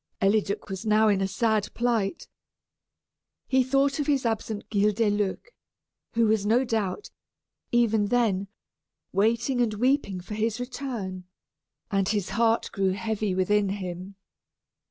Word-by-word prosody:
Eliduc 200 0 +1
was 190 -1 -5
now 215 0 +4
in 200 -2 +2
a 195 - +1
sad 210 +2 0
plight. 235 +1 -1 1.2
He 260 -1 +3
thought 275 +2 +1
of 290 - -1
his 275 -4 +1
absent 220 -2 -2
Guildeluec, 210 - 0 0.6
who 230 0 +3
was 215 -2 +2
no 230 +5 +3
doubt, 225 - -2 0.6
even 225 -3 +3
then, 205 -4 +1 0.7
waiting 235 +6 +1
and 220 -3 +1
weeping 245 -4 +1
for 180 +4 -8
his 220 +2 -1
return, 240 -8 -5 0.7
and 195 -1 +1
his 205 -3 -1
heart 230 0 +1
grew 195 -1 +1
heavy 215 -1 -2
within 200 +2 +2
him. 185 0 -5
215 Hz, 130 wpm, -26 LUFS, 195-235 Hz, 1.2 s, now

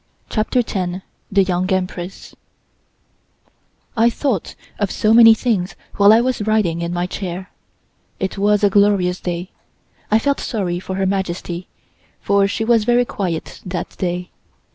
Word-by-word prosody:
CHAPTER 230 +3 +1
TEN 185 -3 -3 0.3
THE 195 0 +4
YOUNG 185 0 -1
EMPRESS 185 0 -3 1.6
I 230 0 +4
THOUGHT 235 - -2 0.2
of 205 -2 0
so 215 +3 +2
many 225 -1 +8
things 215 -6 -1 0.2
while 200 +1 +7
I 225 +2 +6
was 255 -2 -1
riding 195 -6 +1
in 170 0 -2
my 175 0 -1
chair. 185 0 -6 0.7
It 190 - -2
was 205 +1 +2
a 205 - +5
glorious 195 -3 +3
day. 175 +1 -4 0.6
I 215 - +4
felt 280 +5 0
sorry 185 -7 -2
for 190 +1 -5
Her 195 0 0
Majesty, 185 -2 -3 0.5
for 200 0 +2
she 220 +2 -2
was 230 -2 +3
very 245 +2 +3
quiet 175 -8 -4
that 180 -1 -5
day. 180 -1 -3
195 Hz, 145 wpm, -19 LUFS, 180-220 Hz, 1.6 s, many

